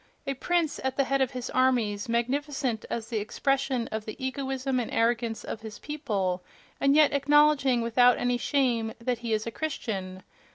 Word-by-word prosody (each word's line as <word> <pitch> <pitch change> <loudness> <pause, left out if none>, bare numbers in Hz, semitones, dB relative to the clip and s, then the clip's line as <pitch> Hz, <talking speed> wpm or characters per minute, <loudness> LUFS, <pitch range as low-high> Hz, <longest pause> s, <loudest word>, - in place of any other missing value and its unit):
A 275 - -1
prince 335 +3 0
at 265 -1 -2
the 275 - +4
head 275 +1 0
of 260 - +2
his 250 -1 -5
armies, 235 -5 +1
magnificent 255 0 -1
as 225 -1 -4
the 225 -3 -1
expression 265 +3 0
of 220 -1 -4
the 215 - -6
egoism 265 -1 -2
and 235 - -3
arrogance 230 0 0
of 220 - -6
his 220 -1 -8
people—and 235 - -2
yet 305 -1 +5
acknowledging, 285 -3 +4
without 245 +1 +4
any 245 0 0
shame, 240 -5 +1
that 240 0 -1
he 235 -1 -4
is 215 0 0
a 230 - -3
Christian!... 195 -11 -4
250 Hz, 170 wpm, -27 LUFS, 225-275 Hz, -, yet